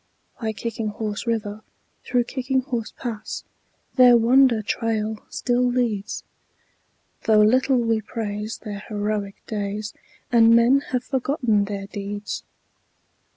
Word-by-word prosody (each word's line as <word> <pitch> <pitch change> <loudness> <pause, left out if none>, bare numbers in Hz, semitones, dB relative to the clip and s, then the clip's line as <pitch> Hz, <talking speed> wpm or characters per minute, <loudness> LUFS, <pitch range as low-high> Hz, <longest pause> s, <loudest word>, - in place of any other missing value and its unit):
By 220 -1 0
Kicking 225 0 -4
Horse 210 +1 -4
River, 215 -2 -2 0.4
through 245 -1 +1
Kicking 260 +1 -1
Horse 240 -4 -4
Pass, 225 -4 -5 0.5
Their 250 -2 +8
wonder 240 -1 +4
trail 220 0 -2
still 245 0 0
leads, 240 -4 -1 1.0
Though 215 -1 +5
little 255 +4 +4
we 230 -2 +1
praise 215 -1 -4
their 205 -2 -7
heroic 205 -1 -2
days 210 0 -3 0.4
And 230 -1 +6
men 240 +4 +5
have 250 -1 -1
forgotten 250 -6 +1
their 200 -1 -4
deeds. 205 0 -5
225 Hz, 115 wpm, -23 LUFS, 210-245 Hz, 1.0 s, Their